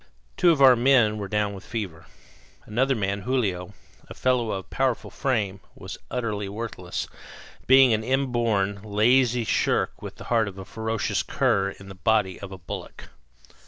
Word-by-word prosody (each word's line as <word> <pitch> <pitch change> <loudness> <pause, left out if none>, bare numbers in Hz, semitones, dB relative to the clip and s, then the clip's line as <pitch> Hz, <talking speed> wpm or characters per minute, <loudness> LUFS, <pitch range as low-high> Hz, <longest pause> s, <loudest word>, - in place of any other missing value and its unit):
Two 175 - +4
of 150 -5 +4
our 130 -2 +9
men 120 -4 +3
were 100 - -4
down 105 0 0
with 95 0 -9
fever. 90 -8 -6 0.6
Another 130 +5 +1
man, 100 -2 -1
Julio, 100 -7 -2 0.3
a - - -9
fellow 125 -3 +1
of 95 -2 -5
powerful 130 -3 -1
frame, 105 -8 -1 0.2
was - - -9
utterly 105 -5 -3
worthless, 100 -4 -5 0.6
being 130 -2 +7
an 110 0 0
inborn, 115 -6 0
lazy 120 +4 +3
shirk - - 0
with - - -8
the - - -11
heart 115 -2 +3
of 100 -1 -8
a 95 - -8
ferocious 110 +1 -2
cur 95 0 +1
in 95 - -12
the 95 - -8
body 95 -1 +1
of 100 -1 -8
a 95 - -7
bullock. 85 -3 -8
110 Hz, 160 wpm, -25 LUFS, 100-125 Hz, 0.6 s, our